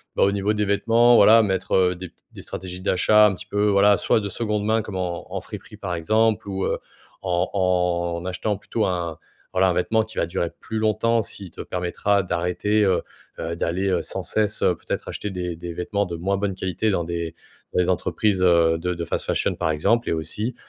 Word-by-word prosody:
bah, - - +3
au 100 - +4
niveau 100 +1 0
des 105 0 0
vêtements, 115 +4 +4
voilà, 110 +3 +7
mettre, 95 -3 -1
heu, 90 -1 +3
des 90 0 -7
p - - -37 0.2
des - - -11
stratégies 90 0 -7
d'achat, 105 +3 +4
un 95 - -1
petit - - -10
peu, 105 +1 +1
voilà, 100 +1 +5
soit - - +2
de 100 - -4
2de 105 0 -2
main, 110 +1 +2
comme 105 -3 -7
en 90 -2 -4
en - - -2
friperie, - - -10
par 90 - -4
exemple, 110 +5 +1
ou, 95 0 -2
heu, - - -1 0.4
en 90 -1 0
en 90 -2 0
achetant 95 +3 -2
plutôt 110 +2 -2
un, 85 -3 -2 0.4
voilà, 95 0 +3
un 90 - +1
vêtement 110 +6 +1
qui 110 0 -12
va - - +2
durer 85 0 -2
plus 110 - -5
longtemps, 110 +2 +2
s'il 100 -2 -8
te - - -8
permettra 95 +3 0
d'arrêter, 90 +5 0
heu 95 -2 +2 0.4
heu, 85 +1 -3
d'aller, 90 +3 -1
heu, 90 - +1
sans - - -3
cesse, 110 -1 0
heu, 90 - +3
peut-être, - - -5
acheter 105 - -4
des 90 -2 -4
des 85 0 -6
vêtements 100 +4 -1
de 85 -2 -5
moins 95 +3 -1
bonne 100 -1 -1
qualité 95 +3 -1
dans 85 -3 0
des 85 -1 -4 0.4
dans - - +1
les 90 - +2
entreprises, 95 +2 0
heu, 85 -2 +4
de 90 +2 -2
de 85 0 -4
fast 85 - -3
fashion, - - 0
par - - -1
exemple. 115 +10 +1
Et - - +1
aussi, 105 +9 -3
95 Hz, 220 wpm, -23 LUFS, 90-105 Hz, 0.4 s, voilà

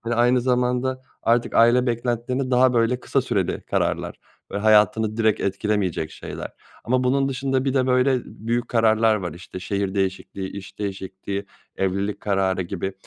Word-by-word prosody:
Hani, 115 0 -2
aynı 120 +1 +3
zamanda 125 +1 0 0.2
artık 115 +1 +1
aile 120 +2 +5
beklentilerini 120 +2 -1
daha, 125 0 +4
böyle, 120 +2 +2
kısa - - +1
süreli - - -1
kararlar - - -1 0.4
ve 100 - -1
hayatını 110 +1 +3
direkt 110 -2 +2
etkilemeyecek 100 -5 -1
şeyler - - -7 0.3
ama 125 +2 +1
bunun 135 +2 +2
dışında 135 0 -1
bir 135 0 0
de, 130 -1 +2
böyle, 130 0 +3
büyük 120 +2 -3
kararlar 110 -1 +3
var, 90 -5 -4
işte, 90 +1 -9
şehir 100 +1 -2
değişikliği, 95 0 -2
iş 100 -1 -10
değişikliği, 100 0 -5 0.3
evlilik 100 +2 -1
kararı 95 -2 0
gibi. 95 +2 -4
115 Hz, 150 wpm, -23 LUFS, 100-125 Hz, 0.4 s, aile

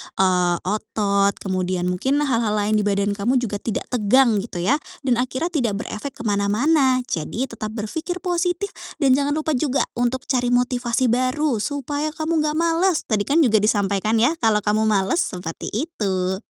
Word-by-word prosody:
eee, 180 -2 +2
otot, 200 0 0
kemudian 185 -1 -1
mungkin 265 +11 0
hal-hal 230 -6 +1
lain 210 +1 +1
di 205 - 0
badan 200 0 +1
kamu 205 +6 0
juga 235 -5 -1
tidak 225 0 -3
tegang 235 -1 +3
gitu 195 -4 -5
ya. 280 +11 +2 0.2
Dan 250 -3 +1
akhirnya 260 +7 -2
tidak 245 - 0
berefek 275 +6 -6
kemana-mana. 250 +6 +2
Jadi, 240 - -3
tetap 215 -1 -6
berpikir 320 - -4
positif 355 +2 -1 0.2
dan 275 -4 +2
jangan 285 +2 +2
lupa 315 0 -1
juga 275 0 +1
untuk 245 +2 -1
cari 250 -3 0
motivasi 245 0 +1
baru 255 +1 +1
supaya 290 +4 -2
kamu 315 -1 0
nggak 300 0 -1
malas. 335 +1 +2
Tadi 210 -3 +1
kan 310 +4 +3
juga 230 -7 +4
disampaikan 205 0 +1
ya, 300 +8 +2
kalau 220 -6 +2
kamu 210 +2 +1
malas. 200 - +1
Seperti 180 -3 -6
itu. 195 - -2
240 Hz, 165 wpm, -22 LUFS, 205-285 Hz, 0.2 s, juga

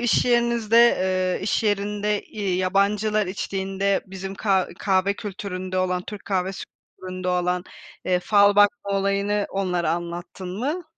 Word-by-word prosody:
iş 240 -1 +2
yerinizde, 235 -2 +2
eee, 185 -6 +3
iş 210 - 0
yerinde, 210 0 0
eee, 200 -4 -3
yabancılar 200 +3 +1
içtiğinde 195 +1 -1
bizim 190 0 -7
ka 195 -2 +1
kahve 195 0 +1
kültüründe 185 -2 -5
olan, 180 -1 0
Türk 210 0 -9
kahvesi 190 -1 -2
kültüründe 185 0 -8
olan, 180 0 0 0.4
eee, 180 -1 +1
fal 205 0 +4
bakma 205 -1 +3
olayını 200 +1 0
onlara 180 -3 -1
anlattın 175 +2 -5
mı? 300 +9 -2
195 Hz, 130 wpm, -23 LUFS, 185-205 Hz, 0.4 s, fal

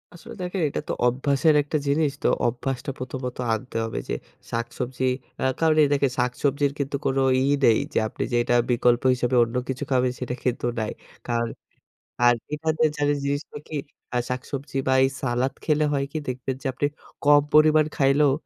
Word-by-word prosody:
আসলে 175 - -11
দেখে 180 +2 -3
এটা - - -3
তো - - +1
অভ্যাসের 140 +5 +2
একটা 150 +2 -1
জিনিস 145 +1 +2
তো - - +3 0.2
অভ্যাসটা 125 +3 -3
প্রথমত 130 0 -5 0.2
আনতে 125 +3 -5
হবে 115 0 -3
যে - - 0 0.4
শাকসবজি 120 +2 -3 0.3
অ্যা 130 - 0
কারণ 160 -1 +3
এই - - +4
দেখেন 140 -2 +2
শাকসবজির 140 +3 +1
কিন্তু 140 0 -2
কোন 135 - +1 0.2
ই - - +2 0.2
নেই 115 -2 +5
যে - - +3
আপনি - - -4
যে - - +1
এটা 120 - +1 0.2
বিকল্প 120 0 +3
হিসাবে 125 0 0
অন্য 115 +1 -4
কিছু 130 - -2
খাবেন 125 -1 +3
সেটা 125 -1 -3
কিন্তু 125 -1 0
নাই। 110 -1 -2 0.4
কারণ 120 -1 0 0.7
আ - - +5 0.3
এখানে 160 +1 -1 0.2
জানেন 145 0 +1
জিনিসটা 145 +2 -3
কি? 155 - -6 0.4
আ - - +3
শাক-সবজি 135 +2 -4
বা 130 - +4
এই 135 - +3
সালাদ 130 +1 0
খেলে 155 -1 +2
হয় 140 -1 +1
কি 155 - -3
দেখবেন 130 +1 -3
যে - - -17
আপনি 135 - -1 0.4
কম 145 0 +7
পরিমাণ 155 0 +6
খাইলেও 140 +1 +4
135 Hz, 180 wpm, -24 LUFS, 125-145 Hz, 0.7 s, কম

